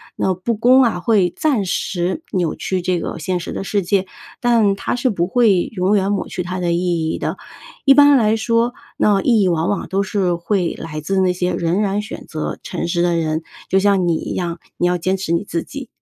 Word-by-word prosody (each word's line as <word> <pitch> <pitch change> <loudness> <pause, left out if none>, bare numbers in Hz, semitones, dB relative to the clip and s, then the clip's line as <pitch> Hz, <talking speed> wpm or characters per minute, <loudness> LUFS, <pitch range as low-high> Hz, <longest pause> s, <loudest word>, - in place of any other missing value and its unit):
那 190 - 0
不 185 +6 -2
公 250 +4 +5
啊， 230 -7 +1
会 185 -3 +2
暂 275 -10 +1
时 180 - -2
扭 175 -5 0
曲 185 -1 -2
这 180 0 0
个 - - -5
现 180 +3 -2
实 170 - -6
的 - - -4
世 200 +1 0
界， 190 +1 +1 0.4
但 230 -5 +3
它 195 - -2
是 245 +1 +1
不 175 -6 0
会 205 -4 +3
永 190 +1 +1
远 195 0 +1
抹 200 - -1
去 180 - -4
它 180 +1 -4
的 175 -1 0
意 170 -2 0
义 - - -2
的。 - - -3 0.5
一 275 - +8
般 290 +1 +7
来 220 -2 +3
说， 230 +2 +1 0.2
那 205 -2 +3
意 230 -2 +3
义 190 - +3
往 170 -1 +1
往 205 - -2
都 195 +1 0
是 190 -3 0
会 175 0 -1
来 155 -1 -6
自 190 +6 0
那 185 -1 +3
些 180 0 -1
仍 175 +3 0
然 205 0 0
选 210 - -8
择 155 -1 -4
诚 175 - -4
实 170 0 0
的 175 -1 +2
人， 160 -1 -1 0.3
就 190 - +3
像 195 -2 +2
你 170 - +2
一 - - -5
样， 170 -2 -3 0.2
你 - - 0
要 180 0 +2
坚 185 +3 0
持 185 -3 -4
你 170 +2 +1
自 170 -4 -3
己。 275 -3 -8
190 Hz, 245 characters per minute, -19 LUFS, 175-210 Hz, 0.5 s, 一